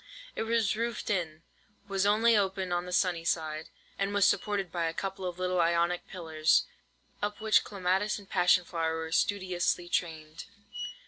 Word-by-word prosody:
It - - -2
was 225 -3 +2
roofed 230 0 -2
in, 165 -5 -2 0.4
was 195 0 +1
open - - +6
only 225 +2 +4 0.4
on 175 0 -1
the - - -6
sunny 180 -2 +1
side, 160 -2 -2 0.3
and 200 +1 -1
was 205 - +5
supported 200 -4 +1
by 170 -2 -1
a 165 0 -2
couple 195 -1 -4
of 175 -1 -5
little 180 -1 +1
Ionic 170 +1 +1
pillars, 160 -3 +1 0.6
up 205 0 -2
which 220 -1 +4
clematis 195 +1 0
and 200 -2 -12
passion 180 -1 +3
flower 165 -2 -1
were 160 0 -5
studiously 180 -2 0
trained. 160 -2 -3
180 Hz, 165 wpm, -30 LUFS, 165-200 Hz, 0.6 s, open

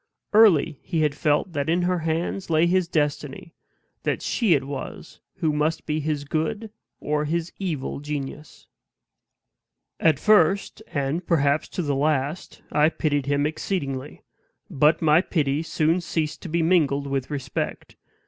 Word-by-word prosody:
Early 200 -10 +5
he 165 -3 -2
had 150 -2 +2
felt 150 +3 0
that 145 0 -1
in 175 +2 +2
her 180 0 +1
hands 165 +4 -2
lay 160 +1 +4
his 180 0 +2
destiny; 150 -1 -2 0.5
that - - -2
she 215 -9 +2
it 140 - -1
was 140 0 -7 0.2
who 155 -2 0
must 150 +2 0
be 155 0 -1
his 150 -1 -2
good 160 +9 -2 0.3
or 150 0 -1
his 170 +2 -2
evil 160 -9 -3
genius. 145 0 -6 1.3
At 160 -4 +4
first, 200 +3 +3
and 145 +4 -2
perhaps 145 -2 +2
to 180 - -3
the 145 -2 0
last, 145 +3 -1
I 150 +1 +4
pitied 145 -4 -1
him 145 0 +1
exceedingly. 150 -4 -3 0.5
But 155 +2 +3
my 155 +2 +5
pity 150 -5 0
soon 165 +1 +1
ceased 160 -3 -3
to 175 - -7
be 165 +1 +1
mingled 150 -5 +2
with 135 -2 -2
respect. 135 -4 -4
155 Hz, 150 wpm, -24 LUFS, 145-170 Hz, 1.3 s, Early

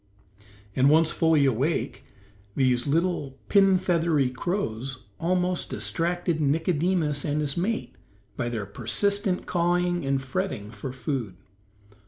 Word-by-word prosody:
And 130 +2 +4
once 160 +1 +5
fully 160 -3 +3
awake, 135 +6 0 0.5
these 125 -2 +2
little 150 -3 0
pin 195 -2 +5
feathery 165 -7 +1
crows 130 - -3 0.2
almost 180 +1 0
distracted 170 -1 -1
Nicodemus 160 0 +1
and 150 0 -1
his 145 -2 -1
mate 210 +6 -2 0.4
by 120 -1 -2
their 110 -4 -3
persistent 185 - -1
cawing 175 0 +1
and 135 0 +1
fretting 130 - -3
for 115 +4 -6
food. 130 - -3
155 Hz, 115 wpm, -26 LUFS, 130-175 Hz, 0.5 s, once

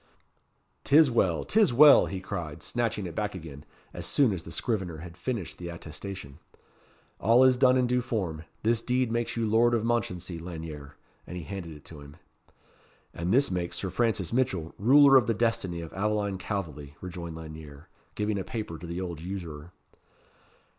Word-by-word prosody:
'Tis 150 -1 +6
well! 95 -8 +2
'tis 215 - +3
well!" 145 +4 +8
he 95 - -4
cried, 90 -6 -6
snatching 115 -4 -2
it 85 - -6
back 105 -2 -2
again, 75 -5 -9 0.3
as - - -6
soon 130 -7 +2
as 90 - -4
the - - -11
scrivener 95 -8 -2
had 85 +1 -10
finished 95 +1 -4
the 85 -1 -6
attestation. 85 -2 -8 0.8
"All 115 +4 +5
is 130 -1 +6
done 130 0 +4
in 125 - +3
due 125 0 +1
form. 90 -10 -3 0.2
This 115 +1 +2
deed 125 -1 0
makes 120 0 -2
you 115 - +1
Lord 120 +2 +4
of 110 - 0
Mounchensey, 90 -7 -2
Lanyere." 80 -4 -8 0.3
And 90 - -6
he 90 - -6
handed 85 +1 -6
it 75 0 -14
to 80 -3 -11
him. 70 +1 -13 1.0
"And 85 +2 -2
this 135 0 +3
makes 90 -1 -2
Sir 95 - -3
Francis 110 -3 0
Mitchell 95 -11 0
ruler 135 +5 +7
of 125 -2 +3
the 115 - +1
destiny 95 -7 -1
of 80 - -9
Aveline 100 -1 -1
Calveley," 75 -9 -5
rejoined 85 -3 -7
Lanyere, 80 -2 -10 0.3
giving 105 -1 -1
a - - -3
paper 105 -6 -5
to 85 - -8
the 85 +2 -4
old 85 -4 -5
usurer. 85 -3 -7
95 Hz, 175 wpm, -28 LUFS, 85-115 Hz, 1.0 s, well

